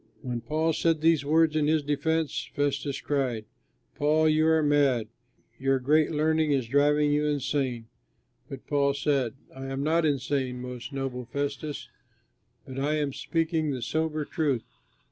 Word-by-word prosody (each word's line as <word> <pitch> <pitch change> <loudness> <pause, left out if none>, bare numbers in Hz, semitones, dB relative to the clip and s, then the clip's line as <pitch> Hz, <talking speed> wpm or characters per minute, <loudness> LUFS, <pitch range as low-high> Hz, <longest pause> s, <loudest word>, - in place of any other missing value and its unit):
When 120 -2 -3
Paul 155 +7 0
said 165 0 +1
these 160 -2 +3
words 155 +1 +3
in 150 -1 +2
his 155 -1 +2
defense, 150 +2 -1
Festus 140 0 -1
cried, 130 -7 -1 0.5
"Paul, 155 +2 +2
you 155 +1 +3
are 160 -1 +4
mad! 140 -6 +2 0.5
Your 135 0 +2
great 150 +4 +3
learning 155 0 +1
is 135 -4 +1
driving 145 +3 +3
you 150 +1 +1
insane!" 135 -4 -1 0.6
But 135 - -8
Paul 140 -1 +1
said, 140 -4 0 0.2
"I 135 0 -6
am 135 +1 -3
not 165 +3 +2
insane, 135 -3 -1
most 125 +1 -7
noble 135 -2 -4
Festus, 145 +3 -4 0.8
but 130 0 -7
I 145 +3 +1
am 145 -3 -1
speaking 165 0 -1
the 130 -4 -3
sober 155 +2 -1
truth. 140 -8 -1
145 Hz, 150 wpm, -27 LUFS, 135-155 Hz, 0.8 s, are